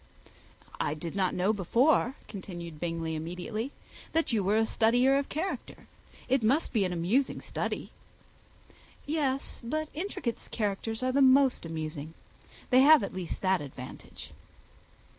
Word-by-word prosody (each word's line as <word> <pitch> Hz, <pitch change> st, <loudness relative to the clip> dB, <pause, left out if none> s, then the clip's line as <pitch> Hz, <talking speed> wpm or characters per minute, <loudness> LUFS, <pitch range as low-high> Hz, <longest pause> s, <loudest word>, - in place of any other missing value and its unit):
"I 145 Hz, -, 0 dB
did 165 Hz, +2 st, -6 dB
not 190 Hz, -2 st, +1 dB
know 190 Hz, +4 st, +2 dB
before," 245 Hz, -, +2 dB
continued 175 Hz, -5 st, -8 dB
Bingley, 165 Hz, -1 st, -2 dB
immediately, 180 Hz, -, -4 dB, 0.4 s
"that 325 Hz, -6 st, +1 dB
you 210 Hz, -3 st, +2 dB
were 205 Hz, +3 st, +2 dB
a 225 Hz, -, +4 dB
studier 245 Hz, +5 st, +3 dB
of 280 Hz, -, -4 dB
character. 340 Hz, +6 st, -4 dB, 0.4 s
It 265 Hz, 0 st, +2 dB
must 260 Hz, +9 st, +1 dB
be 215 Hz, -4 st, +3 dB
an 180 Hz, -, -2 dB
amusing 190 Hz, +11 st, +1 dB
study." -, -, -4 dB, 1.1 s
"Yes; 285 Hz, -3 st, -1 dB
but 310 Hz, +6 st, -2 dB
intricate 310 Hz, -, -4 dB
characters 220 Hz, +2 st, -2 dB
are 255 Hz, -, +2 dB
the 275 Hz, +2 st, +3 dB
most 265 Hz, -7 st, +5 dB
amusing. 155 Hz, -1 st, -5 dB, 0.6 s
They 255 Hz, -, +7 dB
have 300 Hz, -2 st, +7 dB
at -, -, -4 dB
least 185 Hz, -1 st, -5 dB
that 190 Hz, -2 st, +3 dB
advantage." 130 Hz, -3 st, -9 dB
220 Hz, 140 wpm, -29 LUFS, 175-265 Hz, 1.1 s, They